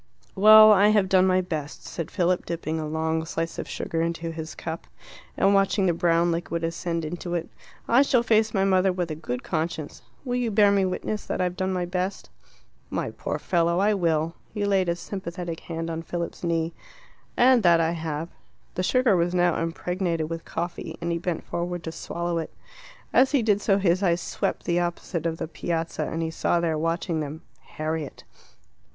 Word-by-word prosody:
"Well, 215 +2 +9
I 205 0 +6
have 210 -2 +3
done 185 0 +4
my 185 0 +3
best," 155 -5 -5
said 165 - -5
Philip, 180 -1 0
dipping 160 -1 -3
a 155 - -3
long 160 +1 -1
slice 165 +1 -4
of - - -5
sugar 165 - -2
into 165 0 -2
his 160 -1 -7
cup, 165 0 -6 0.5
and 195 +1 +4
watching 195 0 +3
the 175 - +3
brown 170 0 +2
liquid 170 0 -2
ascend 165 0 -2
into 175 +2 -4
it. 170 -1 -3 0.4
"I 240 +3 +5
shall 255 -4 +3
face 220 -1 +3
my 195 -3 +1
mother 190 0 +3
with 180 -2 -3
a - - -3
good 125 -5 -5
conscience. 160 -2 -3 0.2
Will 245 -1 -1
you 245 -2 0
bear 205 -1 +5
me 200 -1 +3
witness 210 +3 -3
that - - -2
I've 180 -1 0
done 190 0 -1
my 180 -1 -1
best?" 180 +2 -3 0.6
"My - - -2
poor - - -4
fellow, 170 -2 +1
I 205 +3 +3
will!" 165 -4 +1 0.2
He 205 -1 0
laid 190 -3 +2
a 170 - +1
sympathetic 175 -2 -6
hand 165 0 -5
on 165 0 -3
Philip's 170 +1 -5
knee. 165 -1 0 0.6
"And 250 0 +6
that 170 -3 +5
I 165 0 +2
have 160 -1 -4 0.2
" - - -38
The - - -2
sugar 250 +3 +3
was 175 +1 +1
now 175 -2 +2
impregnated 165 -1 -2
with 165 0 -5
coffee, 170 -2 -5
and 170 0 -2
he 170 - -1
bent 175 -1 -3
forward 175 0 -4
to 160 - -4
swallow 170 +1 -3
it. 160 - -5 0.6
As 265 +3 +4
he 270 -5 +3
did 205 -2 +2
so 195 -2 +3
his 185 -1 +2
eyes 175 -3 +2
swept - - -2
the 175 0 +1
opposite 175 -1 -2
of 165 0 -3
the - - -4
Piazza, 165 0 -3
and 165 0 -3
he 160 - -2
saw 170 - +1
there, 165 -2 0
watching 165 +1 -1
them, 155 +2 -5 0.2
Harriet. 155 -1 -5
170 Hz, 195 wpm, -25 LUFS, 165-190 Hz, 0.6 s, Well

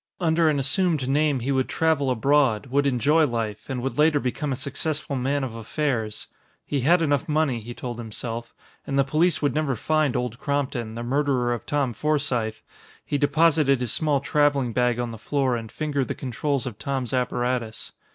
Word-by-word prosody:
Under 165 -2 +3
an 150 - +1
assumed 145 +1 +1
name 145 -1 +2
he 135 +4 -1
would 130 -1 +1
travel 160 -4 +1
abroad, 130 -1 +2
would 140 +1 +2
enjoy 145 +5 +3
life, 110 -4 -4
and 125 -2 -3
would 135 +2 -3
later 150 -1 +4
become 140 +3 -2
a - - 0
successful 140 +2 -3
man 135 +2 0
of 125 -4 -4
affairs. 115 -1 -2 0.4
He 145 - -1
had 165 +6 +4
enough 145 -1 0
money, 150 -5 +1
he 120 +2 -8
told 120 -2 -6
himself. 115 +1 -6 0.3
And 140 - -1
the 140 - +5
police 155 +5 +1
would 145 -4 +2
never 150 -3 0
find 155 +3 +1
Old 125 0 -2
Crompton, 135 -6 -2
the 120 - -4
murderer 130 -1 +1
of 120 - -6
Tom 140 -4 0
Forsythe! 130 -5 -1 0.4
He 145 - -1
deposited 145 -1 +3
his 125 -3 -1
small 150 -4 +1
traveling 140 -5 +2
bag 125 -1 +2
on 120 -1 -2
the 115 - -9
floor 135 0 0
and 115 -2 -6
fingered 145 -4 -1
the - - -3
controls 135 +2 -2
of 120 -6 -6
Tom's 135 -3 -3
apparatus. 125 -2 -1
135 Hz, 185 wpm, -24 LUFS, 120-150 Hz, 0.4 s, the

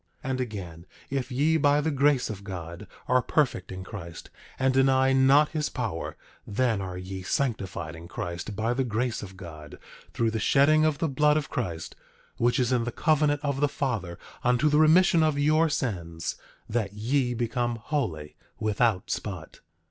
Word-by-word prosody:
10:33 - - -2
And 130 0 -1
again, 90 -8 -6 0.3
if 135 -1 -2
ye 150 +6 +2
by 145 -1 +3
the 155 +2 0
grace 140 -3 +2
of 100 -2 -8
God 90 0 -7 0.2
are 125 0 +4
perfect 125 - 0
in 95 0 -6
Christ, 85 -5 -9 0.3
and 130 0 +2
deny 135 0 +4
not 135 +3 +5
his 155 -2 -2
power, 110 -10 -4 0.3
then 110 -1 +1
are 90 -1 -5
ye 95 +1 -6
sanctified 95 -7 -2
in 85 +1 -10
Christ 85 +4 -5
by 110 +4 0
the 135 +2 0
grace 120 0 -1
of 95 -2 -9
God, 80 -5 -10 0.3
through 115 -1 0
the 110 - -2
shedding 155 +6 +4
of 155 -2 +1
the 165 - 0
blood 150 +2 +3
of 150 - -3
Christ, 85 -9 -4 0.4
which 120 +1 +2
is 125 0 +1
in 125 -2 +2
the 120 - -3
covenant 150 -1 +2
of 140 -2 -1
the 145 - +3
Father 110 -13 -3 0.3
unto 125 +5 +3
the 150 +1 +3
remission 165 +2 +5
of 155 -2 +2
your 155 +3 +3
sins, 85 - -3 0.3
that 105 -3 -2
ye 125 +4 0
become 120 0 -1
holy, 110 - -3 0.2
without 110 -2 +1
spot. 90 -6 -5
120 Hz, 175 wpm, -27 LUFS, 95-140 Hz, 0.4 s, not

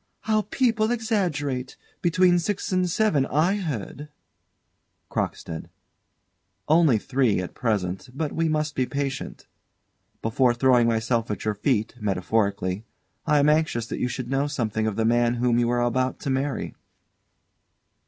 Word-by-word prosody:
_] - - -45 0.2
How 215 0 +1
people 225 -4 +2
exaggerate! 170 - -1 0.2
Between 175 +1 +4
six 200 +3 -2
and 185 -1 +1
seven, 165 -8 +2
I 170 +8 +2
heard. 150 - -5 1.0
CROCKSTEAD. 80 -1 -4 1.0
Only 155 -6 +5
three 125 -3 +1
at 90 - -5
present, 100 -2 -2
but 145 +3 -3
we 165 0 0
must 155 -1 0
be 130 -3 0
patient. 140 -1 -4 0.8
Before 120 +2 +2
throwing 125 -1 +4
myself 115 0 0
at 105 -1 -4
your 105 - +1
feet, 110 +1 0
metaphorically, 100 -1 -1 0.4
I 150 - +4
am 145 0 +4
anxious 150 -7 +1
that - - -4
you - - 0
should 125 0 -5
know 135 +2 +1
something 110 -6 -1
of 110 - -2
the 110 +1 0
man 120 +1 +3
whom 120 0 +2
you 120 -1 +2
are 120 0 +1
about 130 +2 0
to 140 - -2
marry. 135 +2 -2
130 Hz, 145 wpm, -25 LUFS, 115-155 Hz, 1.0 s, Only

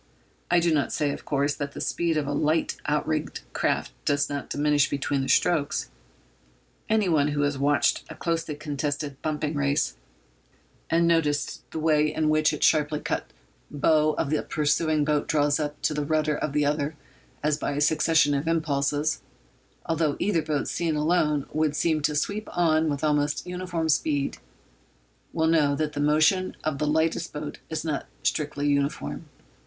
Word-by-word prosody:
I 175 - +4
do 170 -1 +2
not 145 -3 +1
say, 145 -1 0
of - - -7
course, 140 0 +1
that 140 -1 -5
the - - -7
speed 170 -2 0
of 150 - 0
a 145 - -3
light 155 +3 +1
outrigged 150 +1 -1
craft - - 0
does 145 0 +1
not 140 -1 -4
diminish 145 -1 +2
between 140 0 -1
the 135 - -3
strokes. 155 -4 +1 1.0
Anyone 180 -10 +3
who 145 -1 -1
has 145 -1 0
watched 145 +1 +2
a 160 - -8
closely 165 -1 -2
contested 145 -1 -4
bumping 155 0 -2
race, 140 - 0 0.9
and 170 +1 +3
noticed 150 -3 +1
the - - -6
way 155 -1 +2
in 155 0 0
which 155 0 +3
the 150 - -3
sharply 150 -1 +2
cut - - -3 0.4
bow 155 +1 +2
of 145 - -2
the 155 - +1
pursuing 150 0 +1
boat 150 -1 0
draws 145 -2 +2
up 150 -1 -3
to - - +1
the 150 0 -1
rudder 155 0 +1
of 145 -1 -3
the 150 0 +2
other 145 +1 -1 0.5
as 150 0 +1
by - - -2
a 140 - -2
succession 150 0 +3
of 140 +3 -1
impulses, 150 -2 0 0.6
although 160 -3 0
either 185 -5 +1
boat 150 -2 -2
seen 165 -2 -1
alone 150 -2 +1
would 155 -1 +1
seem 155 -1 +1
to 150 0 0
sweep 205 +8 -2
on 160 -2 +3
with 145 0 -3
almost 150 -1 +1
uniform 180 -2 -3
speed, 145 -2 0 0.9
will 160 -1 0
know 155 -3 +3
that 150 +1 -2
the - - -4
motion 155 +6 +2
of 150 -3 -2
the 150 - 0
lightest 160 +2 0
boat 150 0 -6
is 160 0 -3
not 150 -3 -2 0.2
strictly 145 -1 -1
uniform. 145 +2 -1
150 Hz, 170 wpm, -26 LUFS, 145-160 Hz, 1.0 s, I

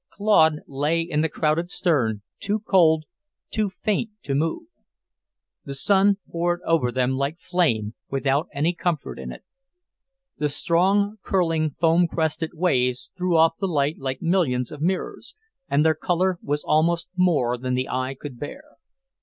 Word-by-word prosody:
Claude 160 -7 +3
lay 145 +4 0
in 165 -2 -1
the 160 - +1
crowded 160 +3 0
stern, 120 - 0 0.2
too 205 +1 0
cold, 170 -7 +3 0.5
too 215 -2 0
faint 215 +3 -2
to 140 - -3
move. 160 - -1 1.0
The 140 - -6
sun 195 +6 +3
poured 175 +1 -1
over 155 -7 +2
them 130 0 +1
like 140 +5 -2
flame, 115 - 0 0.2
without 140 +4 0
any 150 +4 0
comfort 160 - -3
in 65 -1 -6
it. - - -11 1.0
The 150 0 +1
strong, 195 +8 +2
curling, 165 -7 0
foam 170 +1 +4
crested 160 0 -2
waves 125 -7 0
threw 180 -2 +1
off 165 0 +4
the 195 - 0
light 150 -3 0
like 135 +1 -4
millions 155 -9 +1
of 150 - -9
mirrors, 190 - -2 0.3
and 145 +2 +3
their 160 - +5
colour 180 +3 0
was 145 +1 -2
almost 165 +2 +1
more 160 -10 +2
than 125 +1 -2
the 130 +1 -1
eye 130 +1 -2
could 135 -5 -8
bear. 265 - -7
160 Hz, 155 wpm, -24 LUFS, 140-180 Hz, 1.0 s, their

